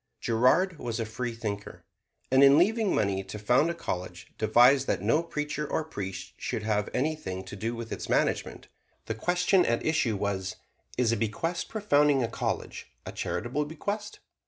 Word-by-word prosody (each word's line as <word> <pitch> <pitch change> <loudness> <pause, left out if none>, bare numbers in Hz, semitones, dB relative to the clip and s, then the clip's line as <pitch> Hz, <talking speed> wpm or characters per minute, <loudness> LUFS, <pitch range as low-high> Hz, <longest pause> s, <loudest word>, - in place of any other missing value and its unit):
Girard 150 +10 +2
was 115 -1 -3
a 115 - -1
freethinker, 110 -3 -5 0.5
and 130 +1 +6
in 140 +1 +8
leaving 215 +4 +3
money 95 -1 0
to 95 +2 -7
found 125 +9 +3
a 170 - -2
college 90 - -6
devised 125 +5 +5
that - - 0
no 155 - +3
preacher 150 -2 -3
or 160 - 0
priest 100 -11 -6
should 110 - -3
have 105 -1 0
anything 130 -11 -2
to 95 +2 -9
do 115 +4 -3
with 115 -1 -7
its - - -5
management. - - 0 0.4
The 115 - -2
question 180 - +2
at 115 0 0
issue 145 -8 +1
was, 95 -2 -2 0.4
"Is 120 -3 +2
a 115 - +1
bequest 140 +12 -2
for 220 - -4
founding 145 -7 +4
a - - 0
college - - -4 0.2
a - - -5
charitable 140 +5 -2
bequest?" 205 +7 -4
125 Hz, 170 wpm, -28 LUFS, 110-155 Hz, 0.5 s, in